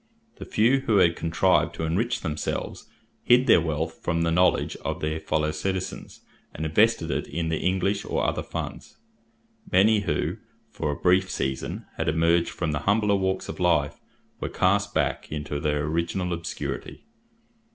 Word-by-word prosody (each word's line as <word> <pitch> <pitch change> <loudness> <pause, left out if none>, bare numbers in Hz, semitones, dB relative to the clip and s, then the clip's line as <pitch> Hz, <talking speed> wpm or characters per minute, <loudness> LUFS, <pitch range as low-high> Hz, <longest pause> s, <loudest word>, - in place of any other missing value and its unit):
The - - -8
few 120 +6 +3
who 110 - +4
had 85 -3 +4
contrived 85 0 +2
to - - -4
enrich 115 +9 0
themselves 75 -1 -4 0.3
hid 125 +1 +5
their 85 - +6
wealth 80 0 -3
from 85 -1 0
the 85 - +1
knowledge 90 +2 +2
of - - -4
their 75 +1 -2
fellow 80 0 0
citizens, 95 +4 -4 0.3
and 80 - -4
invested 85 +1 +2
it - - -2
in 85 -1 -3
the 80 - -1
English 95 +2 0
or - - -1
other - - 0
funds. - - -7 0.7
Many 105 +4 +5
who, 85 -7 -1 0.3
for 75 - -3
a 75 - -1
brief 90 +1 +3
season, 65 -5 -3
had - - 0
emerged 85 +2 +2
from 85 -3 -3
the 75 - -1
humbler 105 -1 +3
walks 95 -1 -1
of - - -7
life, 85 -5 +1 0.4
were - - -3
cast 100 +2 +1
back - - -1
into 75 -1 -3
their 75 0 0
original 85 +3 -1
obscurity. 85 -1 -5
85 Hz, 160 wpm, -25 LUFS, 80-95 Hz, 0.7 s, their